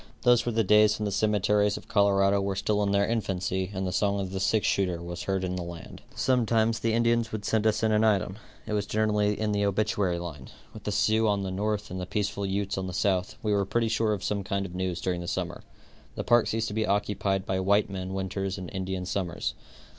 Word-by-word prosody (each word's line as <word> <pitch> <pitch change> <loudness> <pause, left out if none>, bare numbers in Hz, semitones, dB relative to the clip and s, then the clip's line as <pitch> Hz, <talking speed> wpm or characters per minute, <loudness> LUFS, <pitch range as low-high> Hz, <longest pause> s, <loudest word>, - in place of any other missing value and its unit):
Those 120 -1 +4
were - - +2
the 115 0 +2
days 105 +1 +5
when 105 - -3
the 100 - -1
cemeteries 105 0 +2
of - - -11
Colorado 100 -2 +3
were 100 0 -1
still 105 +2 0
in 100 -1 +1
their 100 0 +3
infancy 95 -4 -1
and 95 -1 -3
the 90 - -2
song 100 +2 +1
of 95 -1 -3
the 95 - -3
six 105 +2 +1
shooter 90 -3 +1
was 85 0 -6
heard 95 -1 -1
in 90 0 -2
the 90 - -3
land. 85 -1 -8
Sometimes 115 -3 +2
the 115 0 0
Indians 115 0 +2
would 105 -2 -5
send 110 -1 +2
us 110 0 +1
in 110 - +3
an 105 0 +3
item. 100 -2 +1 0.3
It 105 - -4
was 105 -1 -1
generally 105 -1 +1
in 110 -1 0
the 105 0 +1
obituary 100 -3 +1
line. 80 -6 -7 0.2
With 110 - -11
the 105 - -1
Sioux 110 +2 +2
on 100 -1 +1
the 95 - -3
north 105 +1 -2
and 95 0 -4
the 90 - -5
peaceful 100 -1 -2
Utes 100 0 -1
on 95 - -3
the 90 - -5
south, 95 -1 0
we 105 -1 +1
were 100 -1 +2
pretty 115 +3 0
sure 110 -1 +1
of 100 - -4
some 100 -1 -1
kind 100 +1 -2
of 90 - -8
news 90 -1 -2
during 90 -1 -1
the 85 - -6
summer. 90 -1 -3 0.5
The - - -3
parks 120 -1 +3
used 115 0 -1
to - - -6
be 110 0 0
occupied 100 -1 0
by 95 0 -1
white 100 +2 +3
men 95 0 -4
winters 95 0 -3
and 90 -3 -7
Indians 95 -1 -3
summers. 90 -4 -2
100 Hz, 240 wpm, -27 LUFS, 95-105 Hz, 0.5 s, days